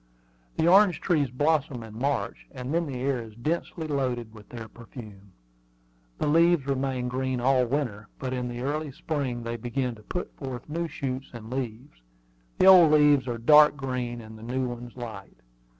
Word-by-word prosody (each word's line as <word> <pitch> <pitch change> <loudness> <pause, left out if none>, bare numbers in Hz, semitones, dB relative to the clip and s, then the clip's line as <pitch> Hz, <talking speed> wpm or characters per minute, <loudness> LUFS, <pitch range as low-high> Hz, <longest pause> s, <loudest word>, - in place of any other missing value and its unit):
The 160 - +2
orange 190 0 +6
trees 150 -7 +1
blossom 140 -2 0
in 110 -1 -11
March; 135 +4 -2
and 130 +1 -6
then 170 -1 +1
the 135 - -5
air 135 -2 0
is 110 -2 -11
densely 160 +6 -3
loaded 125 -6 -2
with 105 -2 -14
their 115 -2 -8
perfume. 105 -4 -12 0.8
The - - -1
leaves 165 0 +4
remain 135 -2 -1
green 130 0 -2
all 130 0 +3
winter; 115 -6 -2
but 130 -1 -4
in 125 -1 -2
the 120 0 -5
early 150 +2 -2
spring 135 -4 -3
they 115 0 -3
begin 125 +2 -2
to 110 - -14
put 180 +11 -5
forth 130 -3 -6
new 165 +3 -2
shoots 135 -3 -4
and 115 -1 -9
leaves. 125 - -5 0.6
The - - +4
old 180 -5 +9
leaves 145 -3 +5
are 120 -1 -2
dark 150 +5 +6
green, 125 -3 -3
and 110 0 -11
the - - -13
new 125 +3 -2
ones 120 0 -8
light. 110 - -8
130 Hz, 180 wpm, -27 LUFS, 120-145 Hz, 0.8 s, old